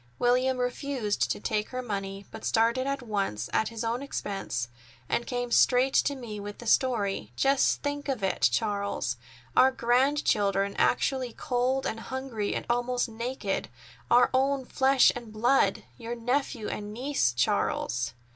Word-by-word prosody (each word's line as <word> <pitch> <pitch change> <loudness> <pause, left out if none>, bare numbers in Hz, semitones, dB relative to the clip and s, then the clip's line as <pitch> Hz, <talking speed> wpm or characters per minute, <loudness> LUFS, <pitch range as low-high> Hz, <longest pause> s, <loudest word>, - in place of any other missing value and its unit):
William 255 +1 +2
refused 250 -3 -1
to - - -1
take 210 0 -1
her 255 0 -4
money, 195 -3 -4
but 220 - -9
started 235 +4 +2
at 275 -1 -2
once, 195 - -2
at 220 - +2
his 230 -1 -5
own 230 +3 -1
expense, 195 - -3 0.4
and 240 - -1
came 245 -1 -3
straight 255 +2 +4
to 285 - +2
me 230 -5 -7
with 205 0 -7
the 240 - -10
story. 205 - +1
Just 275 - +2
think 285 0 -3
of 255 -7 -2
it, 190 - -1
Charles! 205 -3 -1 0.4
Our 260 - +7
grandchildren 235 -6 +1
actually 255 -3 +1
cold 255 +2 0
and 225 - -2
hungry 250 -4 -3
and - - -3
almost 245 +1 0
naked—our 225 - -1
own 270 0 +1
flesh 265 0 +4
and 235 -3 -8
blood! 235 +5 +2
Your 235 0 -5
nephew 245 -1 -1
and 210 0 -5
niece, 250 - 0
Charles." 120 0 0
240 Hz, 145 wpm, -28 LUFS, 205-260 Hz, 0.4 s, Our